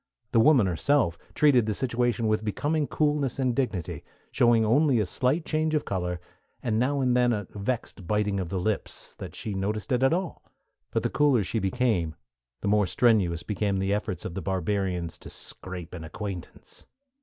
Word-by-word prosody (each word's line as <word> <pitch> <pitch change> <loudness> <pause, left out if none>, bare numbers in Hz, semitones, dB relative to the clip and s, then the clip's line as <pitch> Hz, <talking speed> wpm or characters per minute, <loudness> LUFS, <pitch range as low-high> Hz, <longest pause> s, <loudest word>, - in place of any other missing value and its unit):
The 115 - +4
woman 130 -3 +6
herself 90 - +2 0.2
treated 130 -7 +4
the 105 - 0
situation 120 -3 0
with 110 0 +1
becoming 145 +8 0
coolness 145 -4 0
and 130 -3 +1
dignity, 110 -11 -2 0.3
showing 120 -2 +4
only 140 +5 +4
by 110 - +3
a - - -3
slight 130 - 0
change 155 0 0
of 150 - 0
color, 90 -2 -2 0.4
and 110 -2 +1
now 140 +3 +1
and 125 -1 +2
then 125 -1 +4
a 105 -3 -1
vexed 105 -3 -4
biting 105 -1 +1
of 90 -3 -3
the 95 - -2
lips, 105 +3 -3
that - - -7
she 105 - -4
noticed 105 +6 -2
it 125 0 +2
at 135 - +4
all; 180 +1 -2 0.5
but - - -1
the - - 0
cooler 140 -7 +3
she 110 +4 -1
became 95 -6 0 0.5
the - - -2
more 105 -1 +3
strenuous 95 -8 +2
became 100 -1 -1
the 95 +1 0
efforts 95 -4 -3
of 85 - -4
the 95 - -4
barbarians 95 -2 -2
to - - -10
"scrape 90 -2 -7
an 85 -3 -6
acquaintance." 95 +1 -8
110 Hz, 185 wpm, -27 LUFS, 95-130 Hz, 0.5 s, woman